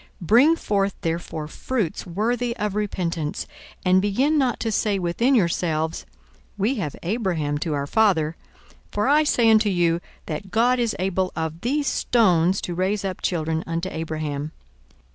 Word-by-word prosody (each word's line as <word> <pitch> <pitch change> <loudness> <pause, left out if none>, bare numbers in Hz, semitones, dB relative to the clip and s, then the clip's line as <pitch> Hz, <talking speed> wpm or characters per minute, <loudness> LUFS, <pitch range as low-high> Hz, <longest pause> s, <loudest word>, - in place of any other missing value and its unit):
42:003:008 - - -27 0.2
Bring 270 +9 +6
forth 200 - 0
therefore 165 -2 -3
fruits 205 +1 -3
worthy 235 +6 -1
of 210 -1 -2
repentance, 175 -7 -2 0.4
and 185 +1 +5
begin 255 +10 +1
not 260 -5 +1
to 225 - -1
say 210 -1 +1
within 195 +9 +1
yourselves, 165 -5 0 0.5
We 210 +6 +1
have 150 -7 -3
Abraham 170 -7 -1
to 155 0 -2
our 140 0 -2
father: 165 -4 +2 0.6
for 210 +4 0
I 300 +2 +5
say 245 -6 +3
unto 215 -1 +4
you, 170 -2 +1 0.2
That 165 +4 -5
God 245 +5 +2
is 235 -2 0
able 185 0 -1
of 160 0 -3
these 285 +5 0
stones 190 -9 +2
to 175 - -4
raise 195 +3 -1
up 190 -1 -4
children 160 -2 -1
unto 170 +3 -2
Abraham. 155 -2 -4
190 Hz, 155 wpm, -23 LUFS, 165-225 Hz, 0.6 s, Bring